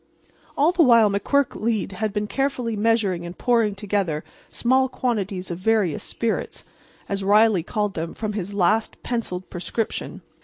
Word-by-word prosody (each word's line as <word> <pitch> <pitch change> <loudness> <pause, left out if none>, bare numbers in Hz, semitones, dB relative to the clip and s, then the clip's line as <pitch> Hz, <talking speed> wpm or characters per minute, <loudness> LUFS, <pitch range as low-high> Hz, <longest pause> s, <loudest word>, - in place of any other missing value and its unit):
All 300 +4 +4
the 355 -1 +2
while 230 -7 +6
McQuirk 225 -1 0
had 215 +3 -2
been 210 0 -2
carefully 250 -1 -1
measuring 210 -5 +1
and 175 +1 -8
pouring 230 -5 +2
together 195 -6 -1 0.3
small 260 +2 +2
quantities 200 -8 -2
of 170 - -4
various 200 -6 +1
spirits, 230 -1 -3 0.4
as 195 0 -2
Riley 210 -1 +4
called 210 +4 -2
them, 165 0 -4
from 215 -1 -3
his 200 -2 -4
latest 205 +3 +1
pencilled 205 -7 -3
prescription. 200 +5 -3
210 Hz, 145 wpm, -23 LUFS, 190-230 Hz, 0.4 s, while